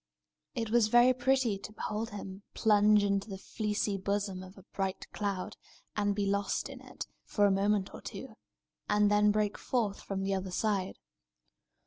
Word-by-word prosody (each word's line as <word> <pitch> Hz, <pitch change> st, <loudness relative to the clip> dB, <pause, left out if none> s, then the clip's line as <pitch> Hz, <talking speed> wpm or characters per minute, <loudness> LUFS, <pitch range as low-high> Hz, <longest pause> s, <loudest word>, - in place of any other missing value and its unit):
It 225 Hz, -2 st, -2 dB
was 235 Hz, -2 st, +5 dB
very 240 Hz, +3 st, +6 dB
pretty 255 Hz, -5 st, +1 dB
to 210 Hz, -, -8 dB
behold 215 Hz, +1 st, -3 dB
him 195 Hz, -2 st, -7 dB
plunge 210 Hz, -1 st, +5 dB
into 200 Hz, +1 st, 0 dB
the 195 Hz, -, -5 dB
fleecy 210 Hz, 0 st, -2 dB
bosom 200 Hz, -1 st, -2 dB
of 185 Hz, +1 st, -12 dB
a 195 Hz, -, -13 dB
bright 195 Hz, -1 st, -2 dB
cloud, 200 Hz, -3 st, -3 dB, 0.4 s
and 205 Hz, -1 st, +1 dB
be 205 Hz, -1 st, 0 dB
lost 200 Hz, 0 st, 0 dB
in -, -, -9 dB
it, -, -, -7 dB, 0.2 s
for 205 Hz, -, +2 dB
a 200 Hz, -, +4 dB
moment 200 Hz, 0 st, +1 dB
or -, -, -9 dB
two, 265 Hz, -4 st, -8 dB, 0.6 s
and 210 Hz, 0 st, +4 dB
then 210 Hz, 0 st, +5 dB
break 210 Hz, 0 st, +1 dB
forth 220 Hz, -6 st, -1 dB
from 195 Hz, -1 st, -3 dB
the 195 Hz, 0 st, 0 dB
other 190 Hz, 0 st, -2 dB
side. 195 Hz, 0 st, -1 dB
205 Hz, 170 wpm, -31 LUFS, 195-215 Hz, 0.6 s, very